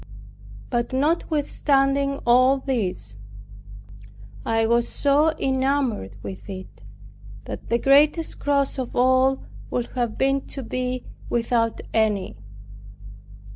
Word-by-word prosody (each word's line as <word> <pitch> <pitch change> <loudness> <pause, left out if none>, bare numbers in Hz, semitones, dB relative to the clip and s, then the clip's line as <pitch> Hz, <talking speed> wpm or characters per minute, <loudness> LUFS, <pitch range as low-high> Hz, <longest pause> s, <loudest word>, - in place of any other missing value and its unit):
But 240 +1 -1
notwithstanding 280 -2 +1
all 255 +3 +5
this, 190 - -3 1.3
I 225 0 +1
was 235 +1 +2
so 290 +3 +3
enamored 265 - 0
with 190 +1 -8
it, 185 -1 -9 0.6
that - - -8
the 235 - +3
greatest 295 +6 +3
cross 280 -1 +1
of 255 - -5
all 260 +1 +3 0.3
would 245 -1 -2
have 240 -3 -2
been 275 +1 +2
to 270 - -5
be 255 +1 -3 0.2
without 230 -1 0
any. 215 -3 +1
260 Hz, 100 wpm, -23 LUFS, 230-275 Hz, 1.3 s, all